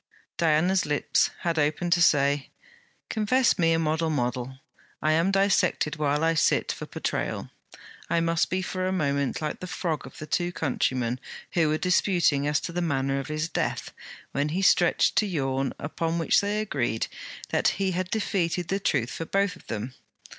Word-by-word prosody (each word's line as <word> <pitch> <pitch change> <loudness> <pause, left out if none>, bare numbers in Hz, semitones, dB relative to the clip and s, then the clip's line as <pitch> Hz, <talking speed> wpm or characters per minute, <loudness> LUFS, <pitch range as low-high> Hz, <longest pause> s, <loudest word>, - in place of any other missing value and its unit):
Diana's 170 +3 +2
lips 150 -1 +2
had 170 -2 0
opened 155 +4 +1
to 175 - +2
say: 140 -3 +3 0.6
'Confess 230 +1 +2
me 165 -1 +4
a 165 - +3
model 160 0 0
model: 125 -2 -2 0.4
I 155 - +1
am 165 +4 +3
dissected 195 -5 +2
while 150 0 +1
I 165 0 +3
sit 155 - +2
for - - -7
portrayal. - - -3 0.6
I 170 - +2
must 165 0 +1
be 185 +1 -1
for 185 0 -2
a - - 0
moment 140 -5 -1
like 150 - -3
the 185 - -6
frog 170 -3 -3
of - - -14
the 155 - -6
two 175 +3 -1
countrymen 125 -5 -1 0.3
who 165 -3 +2
were 155 - +1
disputing 175 -5 +2
as 150 0 +2
to - - -5
the 175 +1 -2
manner 135 -4 0
of 135 - -5
his 155 +1 -2
death, - - -3 0.4
when 145 +2 0
he 180 +5 -1
stretched 175 -2 +4
to 210 - +3
yawn, 135 -6 -1
upon 165 +3 -2
which 165 - +3
they 205 +1 -1
agreed 120 - -1 0.4
that - - +2
he 195 0 0
had 185 0 -2
defeated 180 -5 -1
the 195 - 0
truth 130 - 0
for 165 - -5
both 195 +2 0
of - - -18
them. 115 +4 -4
165 Hz, 180 wpm, -26 LUFS, 145-180 Hz, 0.6 s, me